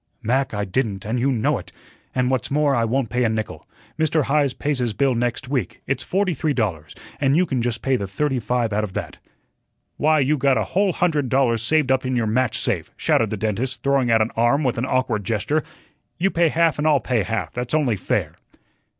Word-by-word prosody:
"Mac, 130 Hz, +4 st, +1 dB
I 105 Hz, -1 st, -2 dB
didn't, 100 Hz, -1 st, -2 dB
and 115 Hz, +3 st, -1 dB
you 135 Hz, +3 st, +2 dB
know 115 Hz, -4 st, +1 dB
it. -, -, -12 dB, 0.4 s
And 125 Hz, 0 st, +1 dB
what's 130 Hz, -3 st, -1 dB
more, 145 Hz, 0 st, +2 dB
I 115 Hz, -3 st, +2 dB
won't 120 Hz, 0 st, -1 dB
pay 125 Hz, 0 st, +1 dB
a 115 Hz, -, +2 dB
nickel. 110 Hz, -1 st, -4 dB, 0.3 s
Mr. 155 Hz, -1 st, +2 dB
Heise 140 Hz, -1 st, +1 dB
pays 145 Hz, -2 st, -1 dB
his 120 Hz, -3 st, -1 dB
bill 135 Hz, -2 st, +2 dB
next 120 Hz, +2 st, -2 dB
week, 130 Hz, -8 st, -2 dB
it's -, -, -1 dB
forty 190 Hz, -1 st, 0 dB
three 150 Hz, 0 st, -1 dB
dollars, 85 Hz, -, -2 dB, 0.2 s
and 140 Hz, +1 st, +3 dB
you 180 Hz, -, +4 dB
can 130 Hz, -7 st, -1 dB
just 115 Hz, -2 st, -2 dB
pay 135 Hz, -1 st, +2 dB
the 100 Hz, -, -4 dB
thirty 135 Hz, +7 st, -1 dB
five 120 Hz, -1 st, -1 dB
out 105 Hz, +1 st, 0 dB
of 100 Hz, -3 st, -5 dB
that." -, -, -5 dB, 0.8 s
"Why, 155 Hz, +1 st, +3 dB
you 145 Hz, +2 st, +2 dB
got 135 Hz, -1 st, +2 dB
a 110 Hz, -, +1 dB
whole 195 Hz, -, +1 dB
hundred 155 Hz, -7 st, 0 dB
dollars 120 Hz, -4 st, +2 dB
saved 145 Hz, +3 st, +2 dB
up 130 Hz, 0 st, +2 dB
in 130 Hz, 0 st, -1 dB
your 120 Hz, -2 st, +1 dB
match 120 Hz, +1 st, +1 dB
safe," 100 Hz, -8 st, -1 dB
shouted -, -, +2 dB
the -, -, -3 dB
dentist, 115 Hz, +4 st, -2 dB
throwing 140 Hz, -3 st, +2 dB
out 115 Hz, -1 st, +4 dB
an 110 Hz, -, -4 dB
arm 120 Hz, +6 st, +2 dB
with 125 Hz, -3 st, 0 dB
an 125 Hz, -, 0 dB
awkward 125 Hz, -5 st, 0 dB
gesture. 115 Hz, +10 st, 0 dB, 0.5 s
"You 190 Hz, +2 st, +1 dB
pay 170 Hz, -1 st, +3 dB
half 165 Hz, -1 st, +2 dB
and 150 Hz, -, +1 dB
I'll 150 Hz, -3 st, +4 dB
pay 120 Hz, -1 st, 0 dB
half, 100 Hz, -5 st, -3 dB
that's 125 Hz, +4 st, -2 dB
only 140 Hz, -8 st, +2 dB
fair." 90 Hz, -, -1 dB
125 Hz, 225 wpm, -22 LUFS, 115-145 Hz, 0.8 s, you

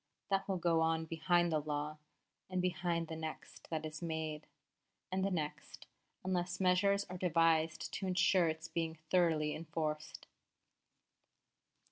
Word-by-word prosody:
That 195 Hz, 0 st, +2 dB
will 190 Hz, -, +1 dB
go 170 Hz, -2 st, +2 dB
on 160 Hz, 0 st, +2 dB
behind 175 Hz, +1 st, +2 dB
the 155 Hz, -, +2 dB
law, 150 Hz, 0 st, -3 dB, 0.5 s
and 185 Hz, -1 st, -1 dB
behind 175 Hz, -2 st, 0 dB
the 160 Hz, -, -5 dB
next 160 Hz, -1 st, -7 dB
that 160 Hz, -1 st, -2 dB
is 155 Hz, 0 st, -6 dB
made, 160 Hz, -2 st, -3 dB, 0.6 s
and 190 Hz, 0 st, 0 dB
the 195 Hz, -, +2 dB
next, 155 Hz, -5 st, -4 dB, 0.4 s
unless 180 Hz, -1 st, -1 dB
measures 200 Hz, +2 st, +3 dB
are 180 Hz, 0 st, -6 dB
devised 165 Hz, -2 st, +2 dB
to 195 Hz, -, -2 dB
ensure 185 Hz, -1 st, +4 dB
its 160 Hz, +1 st, -3 dB
being 165 Hz, 0 st, -2 dB, 0.2 s
thoroughly 160 Hz, -4 st, +3 dB
enforced. 155 Hz, -1 st, -4 dB
165 Hz, 135 wpm, -35 LUFS, 160-180 Hz, 0.6 s, ensure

